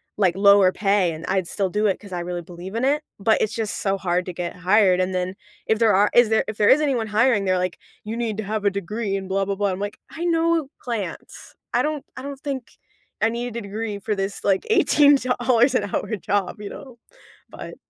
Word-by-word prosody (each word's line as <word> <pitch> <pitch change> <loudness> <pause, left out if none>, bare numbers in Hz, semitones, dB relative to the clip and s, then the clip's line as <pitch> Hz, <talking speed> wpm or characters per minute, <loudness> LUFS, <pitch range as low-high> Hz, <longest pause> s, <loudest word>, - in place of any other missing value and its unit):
like, 190 -4 +2
lower 200 -2 +6
pay, 195 -4 +1
and 160 +1 -7
I'd 190 -2 0
still 195 +1 -1
do 210 +3 +1
it 195 - 0
'cause 200 -3 -11
I 175 - -2
really 175 0 -4
believe 175 +4 -9
in 235 +3 0
it. 295 +2 +1 0.2
But 220 +2 +2
it's 215 - 0
just 220 -2 -2
so 195 -1 0
hard 180 -1 -1
to 180 - -4
get 175 0 -5
hired. 185 0 +3
And 185 +1 -1
then 185 +1 -2 0.3
if 220 0 +1
there 220 -3 +4
are 205 +2 +4
is 240 -2 +5
there 220 - +2
if 215 - -4
there 205 - +4
is 295 - +7
anyone 260 -7 0
hiring, 215 0 +2
they're 185 -1 +1
like, 180 0 -2 0.3
"You 220 +2 -4
need 225 -3 -2
to 220 - -3
have 215 +1 -3
a 200 - +4
degree," 200 +1 -3
and 190 -1 -6
blah 195 +1 0
blah 200 0 -2
blah. 205 0 0
I'm 185 - -4
like, 205 0 -5
"I 330 - -7
know 330 -3 +1
plants." 230 -6 -6 0.2
I - - +3
don't 300 -2 -2
I 255 - -7
don't 280 0 -7
think 275 -4 -6 0.4
I 225 - +4
need 235 +1 -3
a - - -3
degree 205 0 -5
for 210 +1 -2
this, 195 +1 -3
like, 195 -1 +2
$18 260 - +4
an 215 - +2
hour 220 - -1
job, 200 +2 -2
you 205 - -6
know? 260 -3 -11 0.5
But - - -9
205 Hz, 235 wpm, -23 LUFS, 190-235 Hz, 0.5 s, is